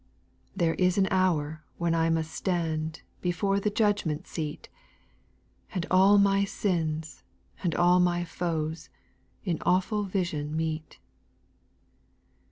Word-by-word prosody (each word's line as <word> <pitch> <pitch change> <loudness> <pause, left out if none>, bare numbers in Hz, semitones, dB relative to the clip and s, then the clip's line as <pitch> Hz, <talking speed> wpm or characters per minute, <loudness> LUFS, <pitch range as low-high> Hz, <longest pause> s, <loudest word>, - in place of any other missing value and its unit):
8. - - -18
There 165 -2 +2
is 180 0 +2
an 195 -1 +4
hour 160 -5 +1
when 170 -1 0
I 165 0 +2
must 160 -1 0
stand 160 -3 -2 0.2
Before 195 +3 +1
the 210 - 0
judgment 205 -7 0
seat; 155 -3 -5 1.1
And 180 -1 -1
all 190 +2 +6
my 200 0 +4
sins, 160 -6 -2 0.4
and 170 -4 0
all 175 +1 +5
my 175 -1 +2
foes. 160 -3 -3 0.6
In 175 -4 -1
awful 190 +4 +1
vision 160 -6 -2
meet. 160 -1 -3
175 Hz, 120 wpm, -28 LUFS, 160-185 Hz, 1.1 s, all